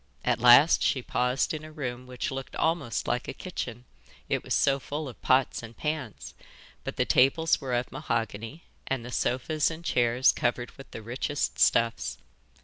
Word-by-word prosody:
At -, -, +2 dB
last 125 Hz, +6 st, +7 dB
she 130 Hz, -, +1 dB
paused 125 Hz, +5 st, 0 dB
in 155 Hz, -1 st, -5 dB
a 155 Hz, -, -10 dB
room 125 Hz, -4 st, -5 dB
which 125 Hz, +1 st, -4 dB
looked 135 Hz, 0 st, -6 dB
almost 160 Hz, -8 st, -1 dB
like 125 Hz, -, -1 dB
a -, -, -5 dB
kitchen, 125 Hz, -, -6 dB, 0.4 s
it -, -, 0 dB
was -, -, -1 dB
so 140 Hz, -1 st, +3 dB
full 145 Hz, +3 st, -5 dB
of 125 Hz, -, -11 dB
pots 130 Hz, 0 st, +2 dB
and 115 Hz, 0 st, -11 dB
pans, 150 Hz, -8 st, -4 dB, 0.5 s
but -, -, -5 dB
the -, -, +1 dB
tables 155 Hz, +6 st, +3 dB
were 130 Hz, -3 st, -2 dB
of 120 Hz, +1 st, -2 dB
mahogany 115 Hz, +2 st, -3 dB, 0.2 s
and 130 Hz, -3 st, -2 dB
the 125 Hz, -, -7 dB
sofas 145 Hz, +6 st, 0 dB
and 165 Hz, +1 st, -8 dB
chairs 120 Hz, 0 st, +3 dB
covered 120 Hz, 0 st, -1 dB
with 135 Hz, -, -14 dB
the 110 Hz, -, -9 dB
richest 130 Hz, +5 st, -2 dB
stuffs. 115 Hz, -, +2 dB
130 Hz, 175 wpm, -28 LUFS, 120-145 Hz, 0.5 s, last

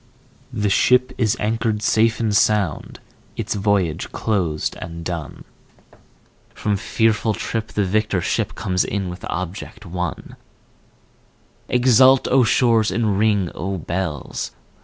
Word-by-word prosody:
The 105 Hz, -1 st, -1 dB
ship 125 Hz, +5 st, +3 dB
is 110 Hz, -4 st, +2 dB
anchored 110 Hz, 0 st, -1 dB
safe 110 Hz, +2 st, +2 dB
and 110 Hz, -3 st, 0 dB
sound, 105 Hz, -7 st, +1 dB, 0.4 s
its -, -, -2 dB
voyage 95 Hz, -5 st, 0 dB
closed 90 Hz, -8 st, -1 dB
and 85 Hz, 0 st, -7 dB
done, 85 Hz, -5 st, -5 dB, 1.1 s
From 105 Hz, -, -1 dB
fearful 110 Hz, +1 st, +1 dB
trip 110 Hz, -1 st, -3 dB
the 105 Hz, -, -1 dB
victor 105 Hz, 0 st, 0 dB
ship -, -, -1 dB
comes 90 Hz, -1 st, 0 dB
in 95 Hz, -2 st, -3 dB
with 90 Hz, 0 st, -8 dB
object 95 Hz, +4 st, -5 dB
won; 90 Hz, -1 st, -5 dB, 1.3 s
Exult 130 Hz, +1 st, +5 dB
O 130 Hz, 0 st, +5 dB
shores, 115 Hz, -1 st, +3 dB
and 105 Hz, -4 st, 0 dB
ring 105 Hz, -5 st, +2 dB
O 95 Hz, +3 st, -3 dB
bells! 85 Hz, -3 st, -4 dB
105 Hz, 120 wpm, -21 LUFS, 90-110 Hz, 1.3 s, Exult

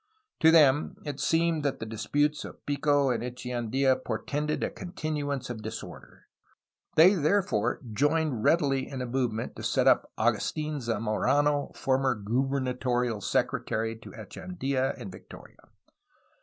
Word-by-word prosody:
To 160 Hz, -, +6 dB
them 150 Hz, -3 st, +5 dB
it 145 Hz, -2 st, -5 dB
seemed 165 Hz, -1 st, +2 dB
that 140 Hz, -2 st, -1 dB
the 115 Hz, -, -4 dB
disputes 145 Hz, +8 st, 0 dB
of -, -, -11 dB
Pico 145 Hz, -1 st, +2 dB
and 120 Hz, -, -1 dB
Eche 125 Hz, 0 st, -7 dB
andfa 130 Hz, +2 st, +1 dB
portended 145 Hz, +7 st, -2 dB
a -, -, -1 dB
continuance 150 Hz, -6 st, -4 dB
of 120 Hz, -3 st, -6 dB
disorder. 110 Hz, +1 st, -9 dB, 0.7 s
They 175 Hz, +5 st, +8 dB
there 190 Hz, +3 st, +2 dB
fore 115 Hz, -5 st, -1 dB
joined 145 Hz, -1 st, +1 dB
readily 140 Hz, -5 st, +2 dB
in 130 Hz, -2 st, -4 dB
a -, -, -3 dB
movement 120 Hz, -3 st, -2 dB
to -, -, -7 dB
set -, -, +1 dB
up -, -, +4 dB
Agustln 150 Hz, -2 st, 0 dB
Za 115 Hz, -3 st, -1 dB
morano, 145 Hz, +7 st, +1 dB
former 130 Hz, -1 st, +1 dB
gubernatorial 125 Hz, 0 st, -1 dB
secretary 110 Hz, +3 st, -1 dB
to -, -, -12 dB
Echeandia 135 Hz, -, -3 dB
and 95 Hz, -, -7 dB
Victoria. -, -, -14 dB
135 Hz, 140 wpm, -28 LUFS, 120-150 Hz, 0.7 s, They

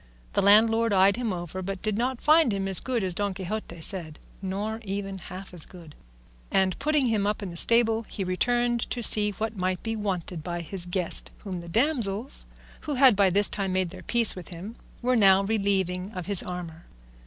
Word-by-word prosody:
The -, -, +1 dB
landlord 225 Hz, +2 st, +4 dB
eyed 195 Hz, +1 st, +4 dB
him 240 Hz, -3 st, -2 dB
over 175 Hz, +1 st, -6 dB
but 195 Hz, 0 st, -6 dB
did 215 Hz, -2 st, 0 dB
not 245 Hz, +2 st, -2 dB
find 310 Hz, -4 st, +4 dB
him 195 Hz, -1 st, -2 dB
as 190 Hz, -2 st, +1 dB
good 245 Hz, -5 st, -2 dB
as 185 Hz, -1 st, -1 dB
Don 200 Hz, +1 st, -2 dB
Quixote 190 Hz, -2 st, -6 dB
said, 160 Hz, -4 st, -4 dB, 0.2 s
nor 205 Hz, +4 st, -4 dB
even 195 Hz, -1 st, -5 dB
half 185 Hz, +1 st, -10 dB
as 170 Hz, -3 st, +1 dB
good; 170 Hz, -5 st, -14 dB, 0.6 s
and 190 Hz, -1 st, 0 dB
putting 300 Hz, -1 st, +1 dB
him 215 Hz, -4 st, 0 dB
up 210 Hz, 0 st, -2 dB
in 190 Hz, -, -6 dB
the -, -, -10 dB
stable, 225 Hz, +3 st, +4 dB
he 195 Hz, -, -4 dB
returned 240 Hz, +6 st, 0 dB
to 240 Hz, -, -4 dB
see 210 Hz, -1 st, +4 dB
what 220 Hz, +2 st, -5 dB
might 185 Hz, -1 st, -2 dB
be 225 Hz, 0 st, -3 dB
wanted 185 Hz, -6 st, -4 dB
by 175 Hz, +1 st, -4 dB
his 180 Hz, +1 st, -2 dB
guest, 175 Hz, -1 st, +2 dB
whom 185 Hz, -4 st, -5 dB
the 170 Hz, -, -11 dB
damsels, 235 Hz, -, +1 dB, 0.3 s
who 295 Hz, -2 st, -4 dB
had 260 Hz, -3 st, +6 dB
by 195 Hz, -1 st, +3 dB
this 200 Hz, +3 st, +4 dB
time 195 Hz, -2 st, -3 dB
made 185 Hz, -2 st, -1 dB
their 185 Hz, 0 st, -10 dB
peace 235 Hz, +4 st, +1 dB
with 180 Hz, -2 st, -9 dB
him, 185 Hz, +6 st, -8 dB, 0.3 s
were 250 Hz, +1 st, +2 dB
now 195 Hz, -3 st, +5 dB
relieving 195 Hz, -3 st, -1 dB
of 180 Hz, -2 st, -6 dB
his 200 Hz, -2 st, +8 dB
armour. 175 Hz, -2 st, -8 dB
195 Hz, 200 wpm, -26 LUFS, 185-225 Hz, 0.6 s, his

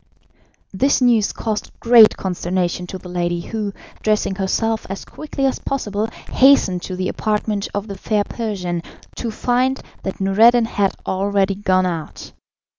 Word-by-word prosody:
This 270 Hz, +9 st, +2 dB
news 235 Hz, -5 st, +3 dB
caused 215 Hz, -2 st, -4 dB
great 230 Hz, -2 st, +7 dB
consternation 180 Hz, -1 st, -2 dB
to 190 Hz, -, -6 dB
the 185 Hz, -, -12 dB
lady, 175 Hz, -1 st, -1 dB
who, 210 Hz, +2 st, -4 dB, 0.3 s
dressing 215 Hz, -2 st, +1 dB
herself 220 Hz, +4 st, -1 dB
as 195 Hz, -, -6 dB
quickly 295 Hz, -2 st, -4 dB
as 265 Hz, -, 0 dB
possible, 215 Hz, -5 st, -2 dB, 0.2 s
hastened 255 Hz, -10 st, +4 dB
to 185 Hz, -, -5 dB
the 185 Hz, 0 st, -2 dB
apartment 210 Hz, -1 st, -1 dB
of 205 Hz, 0 st, -2 dB
the 200 Hz, -2 st, -7 dB
fair 210 Hz, -2 st, +1 dB
Persian, 190 Hz, -7 st, -3 dB, 0.4 s
to 235 Hz, -, -3 dB
find 250 Hz, +4 st, 0 dB, 0.2 s
that 190 Hz, -, -5 dB
Noureddin 225 Hz, +5 st, +5 dB
had 200 Hz, -3 st, 0 dB
already 195 Hz, +1 st, +1 dB
gone 190 Hz, -2 st, +1 dB
out. 165 Hz, -3 st, -5 dB
205 Hz, 145 wpm, -20 LUFS, 185-225 Hz, 0.4 s, great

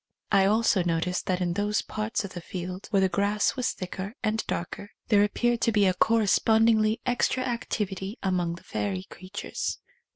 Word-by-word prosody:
I 195 Hz, -2 st, +5 dB
also 215 Hz, -1 st, +3 dB
noticed 175 Hz, +1 st, -1 dB
that 185 Hz, -1 st, 0 dB
in 175 Hz, -1 st, 0 dB
those 205 Hz, +2 st, 0 dB
parts 215 Hz, 0 st, -2 dB
of 190 Hz, -, -8 dB
the 175 Hz, -, -6 dB
field 180 Hz, +2 st, -6 dB
where 195 Hz, -2 st, +3 dB
the 190 Hz, -, +4 dB
grass 200 Hz, +2 st, +1 dB
was 255 Hz, -2 st, 0 dB
thicker 190 Hz, +3 st, -6 dB
and 220 Hz, 0 st, 0 dB
darker, 190 Hz, +3 st, -4 dB, 0.2 s
there 205 Hz, -3 st, +5 dB
ap 205 Hz, -, -1 dB
peared 240 Hz, -1 st, +1 dB
to 230 Hz, -, +3 dB
be 205 Hz, -2 st, +3 dB
a 185 Hz, -, +3 dB
correspondingly 220 Hz, +1 st, +3 dB
extra 250 Hz, +1 st, +1 dB
activ 235 Hz, -5 st, -2 dB
ity 190 Hz, +4 st, -5 dB
among 180 Hz, -3 st, 0 dB
the -, -, -14 dB
fairy 100 Hz, -3 st, -3 dB
creatures. 190 Hz, -, -5 dB
200 Hz, 185 wpm, -27 LUFS, 185-220 Hz, 0.2 s, I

